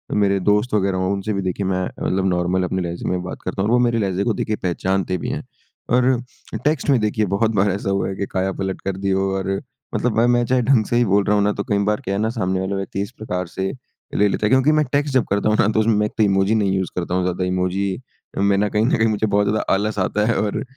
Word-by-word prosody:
मेरे 100 -1 +2
दोस्त 105 +5 +1
वगैरह 100 -2 +1
हो 95 +1 0
उनसे 100 +2 -2
भी 100 - -1
देखिए 95 +1 -2
मैं 95 -1 0
मतलब 95 +1 -2
नॉर्मल 90 +1 +1
अपने 95 +1 -1
लहज़े 85 0 -4
में 90 -1 -1
बात 90 - -7
करता 95 +1 -3
हूँ। 100 - 0
और - - +2
वो - - +2
मेरे 120 -1 +1
लहज़े 95 -2 0
को 115 - +1
देखिए 110 - -2
पहचानते 95 +1 0
भी - - -4
हैं। - - -3 0.5
और 125 0 +3 0.4
टेक्स्ट 150 -1 +1
में 135 -3 +4
देखिए 110 0 +1
बहुत 110 +2 +2
बार 100 +1 +3
ऐसा 100 +1 -3
हुआ 95 0 0
है 95 - -4
की 100 - -2
काया 95 0 -1
पलट 95 0 -4
कर 95 -1 -3
दी 100 0 -2
हो 95 0 +1
और 95 0 -2 0.4
मतलब 120 -3 0
मैं 115 - +4
मैं 120 0 +3
चाहे 125 +1 +2
ढंग 120 -2 +3
से 120 - -2
ही 120 - +4
बोल 100 0 +3
रहा 105 - +2
हूँ 100 - +3
ना 105 - +2
तो 100 - -3
कई 105 - 0
बार 105 - 0
क्या 95 - -3
है - - -1
ना 110 - +1
सामने 95 -5 -1
वाला 95 +1 -2
व्यक्ति 95 0 -3
इस 100 - -4
प्रकार 90 -4 -3
से 95 +2 -3 0.4
ले 105 - +4
लेता 105 - -1
है। - - +2
क्योंकि 130 +3 +4
मैं 155 0 +3
टेक्स्ट 145 0 0
जब 130 -3 +4
करता 100 +2 +1
हूँ 105 - +2
ना - - +4
तो 110 0 +1
उसमें 110 +1 +3
मैं 105 0 +2
एक 105 - -3
तो 110 - +4
इमोजी 100 +1 +2
नहीं 100 -3 +1
यूज़ 95 -1 -2
करता 90 0 -3
हूँ 95 - +1
ज़्यादा 90 0 -1
इमोजी 90 +1 0 0.5
मैं 100 0 +3
ना 105 +1 +2
कहीं 105 +1 +1
न 140 +6 +2
कहीं 110 0 +3
मुझे 110 0 0
बहुत 105 0 +2
ज़्यादा 110 +1 +1
आलस 105 +2 0
आता 105 +3 +1
है। 115 - +2
और 105 -1 -2
100 Hz, 285 wpm, -21 LUFS, 95-110 Hz, 0.5 s, में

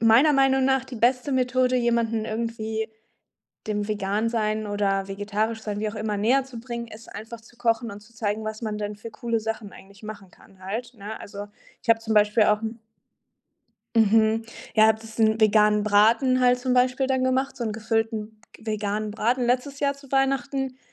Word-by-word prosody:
meiner 235 +7 +6
Meinung 270 -1 +3
nach 265 0 +2
die 255 -2 -9
beste 250 +4 +2
Methode, 255 0 +2
jemanden 235 -2 +1
irgendwie 220 0 -3 0.8
dem 210 0 -1
Vegansein 215 +1 -1
oder 195 -1 0
Vegetarischsein- 210 +1 -2
wie 215 0 -1
auch - - -9
immer- 210 -1 -2
näherzubringen, 235 0 -1
ist 225 +1 -12
einfach, 225 +3 -8
zu 235 +1 -20
kochen 230 -1 0
und 200 - -9
zu 230 +3 -20
zeigen, 215 -1 -2
was 215 +1 -5
man 215 -1 -2
denn 210 0 -4
für 225 +2 -9
coole 230 0 -2
Sachen 220 -2 -4
eigentlich 200 +1 -15
machen 205 -3 -9
kann 190 - -21
halt, 230 +6 -4
ne? 210 +1 -7
Also, 200 0 -8 0.4
ich 245 - -8
hab 225 0 +5
zum 220 -1 -2
Beispiel 210 +1 +5
auch 210 0 +2
'n 225 +1 -5 1.2
Mhm, 220 +1 +4 0.3
ja, 220 0 +7
habe 220 0 +3
das 225 0 -12
'n 220 0 +3
veganen 210 -1 +4
Braten 230 +5 +4
halt 250 0 +4
zum 250 0 -1
Beispiel 255 +1 +2
dann 260 -1 +1
gemacht, 260 +1 0
so 240 - -5
'n 220 - -2
gefüllten 220 0 -2 0.2
veganen 215 -1 -2
Braten 240 +4 0
letztes 255 +3 0
Jahr 280 -1 +2
zu 275 -1 -17
Weihnachten. 270 -1 0
225 Hz, 180 wpm, -25 LUFS, 210-245 Hz, 1.2 s, ja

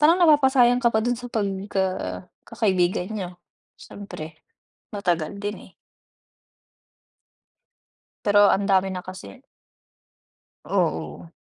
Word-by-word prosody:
parang 325 +4 +5
napapasayang 265 -7 +5
ka 235 - +5
pa 220 - +1
dun 245 +1 +1
sa 245 0 -8
pagka 190 - -2 0.2
kakaibigan 185 -4 0
niyo. 195 -5 -4 0.5
Syempre, 160 -6 -10 0.6
matagal 175 -2 -1
din, 205 +1 -3
eh. - - -28 2.5
Pero 205 0 +5
ang 200 - +2
dami 195 -1 +2
na 185 -1 -5
kasi. 185 - -10 1.2
Oo. 80 - -2
200 Hz, 100 wpm, -24 LUFS, 180-230 Hz, 2.5 s, parang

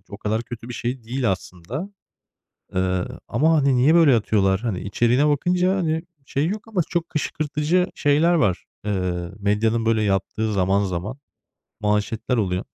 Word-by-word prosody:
o 100 - -9
kadar 110 +1 -1
kötü 115 0 -9
bir 125 - -6
şey 120 +2 -3
değil 125 -1 0
aslında, 95 - -6 0.9
ııı, 95 -1 -1
ama, 155 +8 +2
hani, 140 -3 +3
niye 135 +6 +4
böyle 160 -7 +6
atıyorlar? 100 -4 +2
Hani, 110 -6 -2
içeriğine 120 +8 +2
bakınca, 180 +6 +2
hani, 160 -3 0 0.2
şey 140 +4 0
yok 210 +4 -4
ama 210 -5 0
çok 170 -1 -1
kışkırtıcı 155 +3 0
şeyler 150 +4 +3
var. 115 - +1 0.2
Iıı, 90 -3 -2
medyanın 110 +3 +1
böyle 110 -1 +2
yaptığı 105 +2 0
zaman 100 +1 +2
zaman 95 +7 -4 0.6
manşetler 105 +4 0
oluyor. 95 -3 0
115 Hz, 150 wpm, -23 LUFS, 100-150 Hz, 0.9 s, böyle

